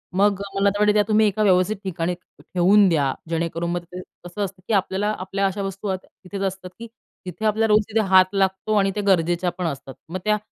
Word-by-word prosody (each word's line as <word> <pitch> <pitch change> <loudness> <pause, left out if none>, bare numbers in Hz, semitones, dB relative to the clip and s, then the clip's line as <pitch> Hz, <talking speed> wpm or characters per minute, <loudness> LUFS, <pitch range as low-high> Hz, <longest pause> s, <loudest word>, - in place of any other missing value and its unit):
मग 200 0 +2
मला 200 +1 +3
तर 205 +1 -4
वाटते 210 0 +4
की 210 - +4
तुम्ही 215 0 +4
एका 210 +1 0
व्यवस्थित 185 +1 +3
ठिकाणी 175 -2 -2 0.3
ठेवून 195 +3 +3
द्या. 140 -5 +1 0.2
जेणेकरून 170 +1 -2
मग 175 0 -3
ते 180 +1 -9 0.2
कसं 175 +4 -6
असतं 190 -1 -10
की - - -1
आपल्याला 195 +1 0
आपल्या 195 +1 -2
अशा 195 +1 -4
वस्तू 195 0 -3
तिथेच 185 +1 -10
असतात 190 -1 -3
की 230 - -7 0.4
तिथे 180 +4 -6
आपल्याला 220 +1 +2
रोज 210 0 +5
तिथे 220 +1 +1
हात 190 -1 +6
लागतो 195 +2 0
आणि 195 -1 +2
त्या 210 - -2
गरजेच्या 175 -1 +2
पण 180 - -3
असतात. 135 -3 -6 0.2
मग 185 +2 -4
त्या 210 0 +3
190 Hz, 210 wpm, -22 LUFS, 180-205 Hz, 0.4 s, हात